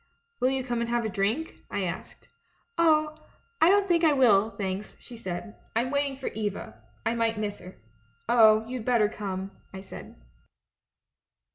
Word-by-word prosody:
'Will 255 Hz, -, +3 dB
you 265 Hz, -1 st, -1 dB
come 240 Hz, -2 st, -2 dB
and 235 Hz, -, -2 dB
have 240 Hz, -1 st, 0 dB
a -, -, -1 dB
drink?' 215 Hz, +11 st, -1 dB
I -, -, -2 dB
asked. -, -, -6 dB, 0.3 s
" 465 Hz, -, -43 dB
'Oh, 310 Hz, -2 st, +4 dB, 0.5 s
I 325 Hz, -, +7 dB
don't 400 Hz, 0 st, +4 dB
think 345 Hz, -2 st, +2 dB
I 310 Hz, -2 st, +6 dB
will, 220 Hz, -6 st, +5 dB
thanks,' 195 Hz, -1 st, -5 dB
she 245 Hz, -, -11 dB
said. 210 Hz, 0 st, -6 dB, 0.2 s
'I'm 240 Hz, +3 st, +1 dB
waiting 280 Hz, -1 st, 0 dB
for 265 Hz, -, -4 dB
Eva 200 Hz, -, -5 dB
— -, -, -34 dB
I 225 Hz, -, +2 dB
might 230 Hz, -1 st, 0 dB
miss 210 Hz, -1 st, -3 dB
her.' 180 Hz, +1 st, -11 dB, 0.3 s
" 115 Hz, +4 st, -39 dB
'Oh, 220 Hz, -2 st, +6 dB
you'd 250 Hz, -2 st, -5 dB
better 235 Hz, -3 st, +3 dB
come,' 195 Hz, -2 st, -5 dB, 0.2 s
I 190 Hz, -, -8 dB
said. 195 Hz, -, -11 dB
230 Hz, 180 wpm, -27 LUFS, 205-265 Hz, 0.5 s, I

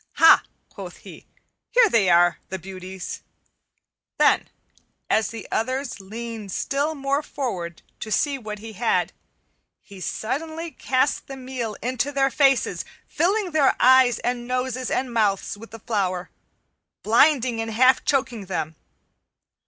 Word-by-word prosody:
"Ha," 325 Hz, -, +7 dB, 0.3 s
quoth -, -, -10 dB
he, -, -, -13 dB, 0.4 s
"here 485 Hz, -2 st, +5 dB
they 220 Hz, -, +3 dB
are, 175 Hz, 0 st, +4 dB
the 190 Hz, -, -3 dB
beauties." 185 Hz, +1 st, -7 dB, 1.0 s
Then, -, -, +3 dB, 0.6 s
as 220 Hz, -1 st, +3 dB
the 225 Hz, -1 st, -8 dB
others 255 Hz, +1 st, -2 dB
leaned 220 Hz, +1 st, -7 dB
still 285 Hz, -, -1 dB
more 275 Hz, 0 st, 0 dB
forward 190 Hz, -, -5 dB, 0.2 s
to 215 Hz, -, -6 dB
see 280 Hz, +5 st, +1 dB
what 215 Hz, -3 st, -6 dB
he 220 Hz, +1 st, -9 dB
had, 225 Hz, +3 st, 0 dB, 0.7 s
he 200 Hz, -2 st, -14 dB
suddenly 315 Hz, -, -4 dB
cast 260 Hz, -1 st, 0 dB
the 270 Hz, -, -7 dB
meal 255 Hz, -4 st, -5 dB
into 255 Hz, +3 st, -1 dB
their 270 Hz, -1 st, +1 dB
faces, 270 Hz, -3 st, +2 dB, 0.2 s
filling 385 Hz, +2 st, 0 dB
their 300 Hz, -4 st, +3 dB
eyes 255 Hz, -2 st, +6 dB
and 245 Hz, 0 st, -3 dB
noses 255 Hz, 0 st, -2 dB
and 255 Hz, -2 st, -1 dB
mouths 205 Hz, -4 st, +1 dB
with 225 Hz, +2 st, -12 dB
the 225 Hz, -, -9 dB
flour, 195 Hz, -5 st, -2 dB, 0.7 s
blinding 245 Hz, 0 st, +3 dB
and 225 Hz, -, -4 dB
half 255 Hz, +4 st, +4 dB
choking 245 Hz, -8 st, -1 dB
them. 160 Hz, -4 st, -3 dB
240 Hz, 135 wpm, -23 LUFS, 210-270 Hz, 1.0 s, Ha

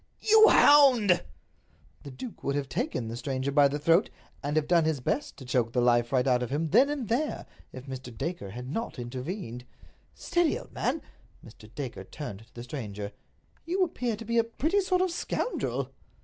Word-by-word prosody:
"You 440 Hz, 0 st, +7 dB
hound!" 255 Hz, -11 st, +6 dB, 0.8 s
The 140 Hz, -, -9 dB
duke 205 Hz, -, -9 dB
would 140 Hz, -, -1 dB
have 145 Hz, -2 st, -2 dB
taken 125 Hz, -2 st, -2 dB
the 115 Hz, -, -5 dB
stranger 130 Hz, +2 st, -2 dB
by 145 Hz, 0 st, +5 dB
the 140 Hz, +1 st, -2 dB
throat, 165 Hz, +7 st, +3 dB, 0.3 s
and 145 Hz, +1 st, -2 dB
have 155 Hz, -1 st, +1 dB
done 170 Hz, -2 st, +4 dB
his 155 Hz, -3 st, 0 dB
best 265 Hz, -, -2 dB
to 135 Hz, -, -10 dB
choke 120 Hz, -2 st, 0 dB
the 125 Hz, -, +1 dB
life 120 Hz, -1 st, +3 dB
right 130 Hz, -2 st, +2 dB
out 125 Hz, -2 st, +3 dB
of 125 Hz, -, -3 dB
him 155 Hz, +4 st, -1 dB
then 255 Hz, -, +5 dB
and 285 Hz, -6 st, -3 dB
there, 265 Hz, +8 st, -1 dB, 0.3 s
if 130 Hz, 0 st, -10 dB
Mr. 130 Hz, -2 st, -7 dB
Dacre 165 Hz, -, -4 dB
had 125 Hz, +5 st, -7 dB
not 225 Hz, -, -4 dB
intervened. 125 Hz, -, -6 dB, 0.5 s
"Steady, 345 Hz, -3 st, +1 dB
old -, -, -12 dB
man!" -, -, -1 dB, 0.4 s
Mr. 110 Hz, -1 st, -14 dB
Dacre 135 Hz, -4 st, -6 dB
turned 110 Hz, -7 st, -8 dB
to -, -, -30 dB
the 120 Hz, -, -7 dB
stranger. 105 Hz, -6 st, -6 dB, 0.5 s
"You 370 Hz, +3 st, +1 dB
appear 250 Hz, -9 st, -2 dB
to 225 Hz, +2 st, -9 dB
be 235 Hz, +1 st, +1 dB
a -, -, +4 dB
pretty 315 Hz, -, 0 dB
sort 370 Hz, -1 st, +1 dB
of 375 Hz, -, 0 dB
a -, -, -5 dB
scoundrel." 485 Hz, -, -2 dB
145 Hz, 195 wpm, -28 LUFS, -, 0.8 s, You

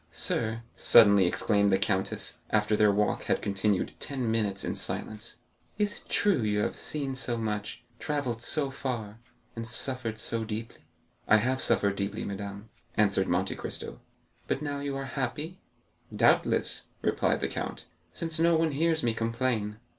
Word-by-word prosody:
"Sir," 115 Hz, 0 st, +1 dB
suddenly 100 Hz, -5 st, +7 dB
exclaimed 100 Hz, +2 st, +2 dB
the 95 Hz, -, +4 dB
countess, 95 Hz, -1 st, -1 dB
after 105 Hz, 0 st, +2 dB
their 105 Hz, -1 st, +5 dB
walk 105 Hz, +1 st, 0 dB
had -, -, +1 dB
continued 100 Hz, -1 st, 0 dB
ten 130 Hz, -5 st, -2 dB
minutes 105 Hz, -3 st, 0 dB
in -, -, -2 dB
silence, 110 Hz, +2 st, -4 dB, 0.4 s
"is 205 Hz, -1 st, 0 dB
it -, -, -13 dB
true 205 Hz, -7 st, +3 dB
that 110 Hz, -, 0 dB
you 105 Hz, 0 st, +1 dB
have -, -, -1 dB
seen 140 Hz, -3 st, -3 dB
so 130 Hz, -2 st, -2 dB
much, 105 Hz, -2 st, -3 dB, 0.2 s
travelled 130 Hz, -6 st, -2 dB
so 140 Hz, +2 st, +1 dB
far, 115 Hz, -5 st, -4 dB, 0.4 s
and 115 Hz, 0 st, -5 dB
suffered 125 Hz, -2 st, 0 dB
so 115 Hz, +1 st, -1 dB
deeply?" 110 Hz, +1 st, -6 dB, 0.4 s
"I 110 Hz, -, +7 dB
have 130 Hz, +4 st, 0 dB
suffered 100 Hz, -1 st, +3 dB
deeply, 100 Hz, 0 st, -2 dB
madame," 100 Hz, +1 st, -6 dB, 0.3 s
answered 100 Hz, -2 st, +3 dB
Monte 95 Hz, +2 st, 0 dB
Cristo. -, -, -6 dB, 0.5 s
"But 140 Hz, -, -1 dB
now 145 Hz, -1 st, -3 dB
you 140 Hz, -1 st, -3 dB
are 135 Hz, -, -4 dB
happy?" 150 Hz, +6 st, -4 dB, 0.5 s
"Doubtless," -, -, +2 dB, 0.2 s
replied -, -, +1 dB
the -, -, +1 dB
count, -, -, -5 dB, 0.3 s
"since 165 Hz, -2 st, -3 dB
no 170 Hz, 0 st, +4 dB
one 160 Hz, -1 st, +2 dB
hears 160 Hz, +2 st, +1 dB
me 120 Hz, -1 st, +2 dB
complain." 115 Hz, -2 st, -1 dB
115 Hz, 160 wpm, -29 LUFS, 105-135 Hz, 0.5 s, suddenly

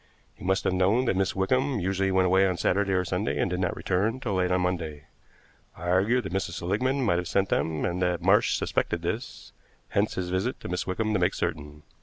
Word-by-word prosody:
He -, -, -15 dB
must 95 Hz, +1 st, +1 dB
have -, -, +1 dB
known 100 Hz, +7 st, +2 dB
that 105 Hz, -, +1 dB
Miss 95 Hz, 0 st, 0 dB
Wickham 130 Hz, +7 st, +1 dB
usually 95 Hz, +1 st, 0 dB
went 95 Hz, 0 st, +3 dB
away 95 Hz, +1 st, +4 dB
on 90 Hz, -2 st, -1 dB
Saturday 100 Hz, +2 st, +1 dB
or 90 Hz, -1 st, +1 dB
Sunday -, -, -1 dB
and -, -, 0 dB
did 90 Hz, -, -1 dB
not 90 Hz, -2 st, -1 dB
return 105 Hz, +7 st, 0 dB
till 115 Hz, -6 st, -3 dB
late 90 Hz, -1 st, +1 dB
on 90 Hz, 0 st, +2 dB
Monday. 80 Hz, -5 st, -3 dB, 0.7 s
I 90 Hz, -, -4 dB
argued 105 Hz, +8 st, +2 dB
that -, -, -6 dB
Mrs. 95 Hz, -3 st, -2 dB
Seligmann 125 Hz, +11 st, 0 dB
might 85 Hz, -5 st, +2 dB
have 90 Hz, -, -4 dB
sent 95 Hz, +3 st, +1 dB
them, 80 Hz, -1 st, 0 dB
and 90 Hz, +1 st, -2 dB
that 90 Hz, -1 st, +1 dB
Marsh 95 Hz, +5 st, +3 dB
suspected 85 Hz, -, -1 dB
this, 110 Hz, +10 st, -5 dB, 0.4 s
hence 100 Hz, +2 st, 0 dB
his 90 Hz, -1 st, -3 dB
visit 95 Hz, +7 st, -1 dB
to -, -, -6 dB
Miss 90 Hz, 0 st, -2 dB
Wickham 110 Hz, +4 st, -1 dB
to 100 Hz, -, +2 dB
make 90 Hz, +2 st, +1 dB
certain. 75 Hz, -3 st, -4 dB
95 Hz, 225 wpm, -27 LUFS, 90-100 Hz, 0.7 s, away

